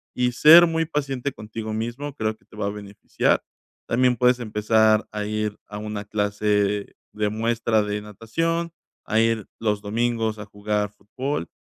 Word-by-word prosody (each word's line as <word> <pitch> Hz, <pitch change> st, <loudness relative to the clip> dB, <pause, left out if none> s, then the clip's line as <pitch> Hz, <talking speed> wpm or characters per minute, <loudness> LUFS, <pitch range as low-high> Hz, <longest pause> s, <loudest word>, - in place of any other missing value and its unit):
y 125 Hz, 0 st, +1 dB
ser 165 Hz, +6 st, +9 dB
muy 165 Hz, 0 st, 0 dB
paciente 140 Hz, -3 st, -2 dB
contigo 110 Hz, +1 st, -6 dB
mismo, 120 Hz, +6 st, -4 dB
creo 110 Hz, -3 st, -1 dB
que -, -, -31 dB
te 105 Hz, -, -17 dB
va 105 Hz, -, -2 dB
a -, -, 0 dB
beneficiar, 100 Hz, 0 st, -1 dB, 0.5 s
también 125 Hz, +1 st, +2 dB
puedes 125 Hz, +1 st, +4 dB
empezar 110 Hz, 0 st, +2 dB
a 105 Hz, -1 st, -3 dB
ir 105 Hz, 0 st, -2 dB
a 105 Hz, -, -7 dB
una 105 Hz, -1 st, -5 dB
clase 105 Hz, 0 st, 0 dB, 0.2 s
de 105 Hz, 0 st, 0 dB
muestra 115 Hz, 0 st, +1 dB
de 105 Hz, 0 st, -3 dB
natación, 165 Hz, -, -2 dB, 0.3 s
a 110 Hz, -, +1 dB
ir 115 Hz, -2 st, +1 dB
los 105 Hz, -2 st, 0 dB
domingos 110 Hz, +1 st, -1 dB
a 105 Hz, -, -6 dB
jugar 105 Hz, 0 st, -2 dB
fútbol. 105 Hz, -, -4 dB
110 Hz, 160 wpm, -24 LUFS, 105-120 Hz, 0.5 s, ser